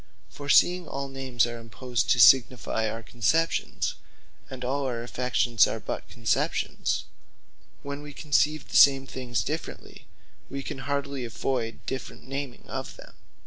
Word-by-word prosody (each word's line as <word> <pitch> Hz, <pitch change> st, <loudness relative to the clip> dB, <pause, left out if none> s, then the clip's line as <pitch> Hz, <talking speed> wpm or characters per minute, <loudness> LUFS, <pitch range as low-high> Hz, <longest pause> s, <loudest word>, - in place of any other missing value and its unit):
For 145 Hz, 0 st, -8 dB
seeing 180 Hz, +1 st, +5 dB
all 140 Hz, 0 st, -4 dB
names 130 Hz, -3 st, 0 dB
are 120 Hz, 0 st, -6 dB
imposed 115 Hz, +2 st, -3 dB
to 125 Hz, -, +4 dB
signifie 120 Hz, -2 st, +5 dB
our 115 Hz, +1 st, -6 dB
conceptions; 120 Hz, +9 st, 0 dB, 0.6 s
and 130 Hz, -1 st, -6 dB
all 135 Hz, +2 st, -1 dB
our 120 Hz, -2 st, -3 dB
affections 120 Hz, -2 st, +2 dB
are -, -, -3 dB
but -, -, -5 dB
conceptions; -, -, -1 dB, 0.8 s
when 140 Hz, 0 st, -5 dB
we 145 Hz, 0 st, -9 dB
conceive 150 Hz, +1 st, +1 dB
the -, -, +2 dB
same 135 Hz, -1 st, +7 dB
things 120 Hz, -6 st, -3 dB
differently, -, -, -6 dB, 0.4 s
we 135 Hz, 0 st, -5 dB
can 135 Hz, -, -6 dB
hardly 140 Hz, -1 st, -2 dB
avoyd 115 Hz, 0 st, -3 dB
different 130 Hz, -1 st, -6 dB
naming 135 Hz, -2 st, -5 dB
of -, -, -5 dB
them. -, -, -14 dB
130 Hz, 145 wpm, -27 LUFS, 120-140 Hz, 0.8 s, same